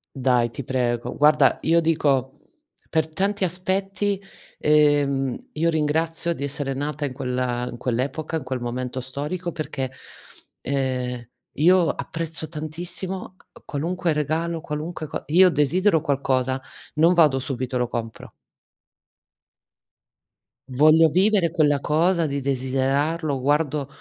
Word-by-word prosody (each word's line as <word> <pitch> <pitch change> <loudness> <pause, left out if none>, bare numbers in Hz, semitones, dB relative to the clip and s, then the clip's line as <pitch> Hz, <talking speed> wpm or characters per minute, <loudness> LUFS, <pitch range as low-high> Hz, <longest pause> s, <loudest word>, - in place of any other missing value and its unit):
Dai, 125 -3 +2
ti 125 +4 -7
prego. 120 -2 -1
Guarda, 150 -3 +4
io 165 +1 +3
dico, 140 -5 +1 0.5
per 160 -1 +1
tanti 195 +5 -1
aspetti, 190 +2 -1 0.4
ehm, 145 -3 +2
io 165 +2 +1
ringrazio 165 +2 0
di 140 - -6
essere 140 -1 -3
nata 145 +2 -3
in 130 - -4
quella 125 -2 -2
in 120 - -8
quell'epoca, 135 +7 -2
in 155 - -6
quel 130 0 -3
momento 125 +1 -4
storico, 150 +7 -4
perché, 135 -5 -4 0.7
ehm, 125 -3 -2 0.3
io 175 +3 +4
apprezzo 165 -1 -4
tantissimo 175 +5 -5 0.2
a - - -17
qualunque 170 +3 -1
regalo, 160 +3 -1
qualunque 155 +1 -5
co - - -5
io 180 +4 +6
desidero 165 +4 +2
qualcosa, 135 -3 0 0.4
non 165 +3 +5
vado 155 -6 +5
subito 130 -1 -3
e - - +1
lo 125 - 0
compro. 115 -1 -6 2.4
Voglio 155 +5 +5
vivere 190 +2 +3
quella 150 -4 +2
cosa 165 +3 +2
di 140 0 -3
desiderarlo. 135 +3 0
Guardo 145 +1 0
150 Hz, 120 wpm, -23 LUFS, 130-165 Hz, 2.4 s, io